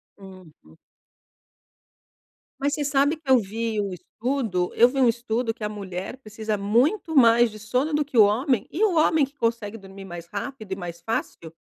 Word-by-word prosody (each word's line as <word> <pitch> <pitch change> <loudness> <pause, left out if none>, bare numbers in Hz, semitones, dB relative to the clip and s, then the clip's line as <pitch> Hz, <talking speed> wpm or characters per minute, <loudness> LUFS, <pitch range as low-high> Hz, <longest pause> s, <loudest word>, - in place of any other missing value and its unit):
Uhum. 185 - -16 1.8
Mas 285 +1 0
você 295 - -1
sabe 285 +2 +2
que 295 -4 -12
eu 260 - +7
vi 220 +1 -2
o 200 -2 -2
estudo, 220 - -2
eu 240 - +7
vi 270 +1 -3
um 255 - +5
estudo 230 0 -1
que 225 -2 -10
a 210 - -1
mulher 195 +2 -6
precisa 215 -3 -4
muito 270 - +1
mais 235 -2 +6
de 215 - -11
sono 255 +8 -1
do 300 0 +2
que 275 -4 -6
o 215 - +9
homem 235 +2 +1
e 390 +7 -1
o 385 -6 +3
homem 310 -2 +4
que 280 +2 -20
consegue 230 -2 -2
dormir 195 -1 -12
mais 175 -2 -9
rápido 210 +1 -7
e - - 0
mais 175 -2 -7
fácil! 170 -5 -4
225 Hz, 185 wpm, -24 LUFS, 195-270 Hz, 1.8 s, o